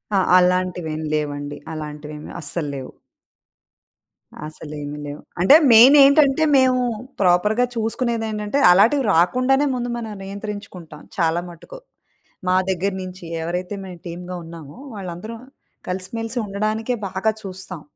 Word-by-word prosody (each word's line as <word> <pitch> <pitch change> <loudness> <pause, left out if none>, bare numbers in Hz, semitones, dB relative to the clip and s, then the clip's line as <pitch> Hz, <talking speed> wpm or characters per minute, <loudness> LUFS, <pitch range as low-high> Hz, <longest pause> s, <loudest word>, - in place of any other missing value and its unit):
ఆ! - - +4 0.2
అలాంటివేమి 180 -4 0
లేవండి. 145 -1 -3 0.2
అలాంటివేమి 150 0 -8
అస్సల్లేవు. 145 -4 -2 1.6
అసలు 155 -1 -10
ఏమీ 145 +1 -6
లేవు. 145 +1 -7 0.2
అంటే 275 +11 +7 0.2
మెయిన్ 245 +6 +9
ఏంటంటే, 280 +1 +4
మేము 255 -1 +3 0.4
ప్రాపర్‌గా 210 +7 +3
చూసుకునేదేంటంటే, 225 0 -2
అలాటివి 235 +9 +4
రాకుండానే 255 - +3
ముందు 245 0 -3
మనం 220 -2 -6
నియంత్రించుకుంటాం 200 -6 -8 0.2
చాలా 170 0 +1
మటుకు. 175 - -12 0.7
మా 185 - +3
దగ్గర 190 +1 -1
నుంచి 185 -1 -9 0.2
ఎవరైతే 180 +4 -3
మేము 180 -2 -10
టీమ్‌గా 180 +1 -7
ఉన్నామో, 165 -3 -11 0.2
వాళ్ళందరూ 190 +4 -7 0.5
కలిసిమెలిసి 225 +6 -3
ఉండడానికే 215 +4 -2
బాగా 190 +4 0
చూస్తాం. 185 -3 -7
185 Hz, 110 wpm, -21 LUFS, 165-225 Hz, 1.6 s, మెయిన్